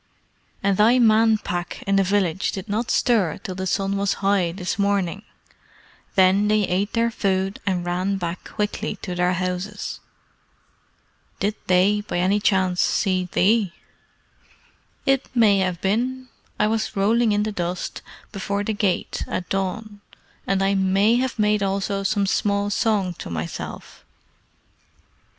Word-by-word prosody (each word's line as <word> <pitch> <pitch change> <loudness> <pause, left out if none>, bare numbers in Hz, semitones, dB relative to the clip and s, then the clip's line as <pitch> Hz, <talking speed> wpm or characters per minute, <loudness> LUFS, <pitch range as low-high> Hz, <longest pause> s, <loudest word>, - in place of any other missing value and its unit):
"And 195 -1 +2
thy 230 +4 +5
Man 225 -2 +5
Pack 175 -4 -5
in 195 - +1
the - - +5
village 190 -2 0
did 190 +2 -6
not 220 +3 -2
stir 210 - +2
till 185 - -6
the 190 +1 -4
sun 195 +1 0
was 200 0 +1
high 195 -4 +2
this 180 +1 -4
morning. 200 -2 0 0.9
Then 190 +2 +4
they 215 0 +3
ate 195 +2 -1
their 230 0 +1
food 195 -2 -1
and 180 -2 0
ran 185 +3 -1
back 175 -1 -4
quickly 210 0 -3
to 180 - -4
their 180 0 +1
houses." 185 +3 -3 1.4
"Did 205 +2 0
they, 190 +3 +3
by 190 -1 0
chance, 190 -3 +2
see 185 -2 +1
thee?" 200 -1 +2 1.3
"It 270 -1 +1
may 210 -4 +5
have 185 -2 -1
been. 250 +6 -1 0.3
I 210 - +4
was 220 +1 -1
rolling 220 +3 +3
in 205 0 +2
the 215 - -2
dust 180 -2 -4 0.3
before 200 0 -2
the 220 - -1
gate 205 -3 -1
at 180 - -4
dawn, 200 +2 -3 0.5
and 195 0 +1
I 195 +1 +2
may 195 +4 +3
have 255 -1 -1
made 210 -1 +2
also 195 0 -1
some 200 +1 +1
small 200 +1 0
song 205 -4 +1
to - - -7
myself. 80 0 -6
200 Hz, 145 wpm, -23 LUFS, 185-210 Hz, 1.4 s, thy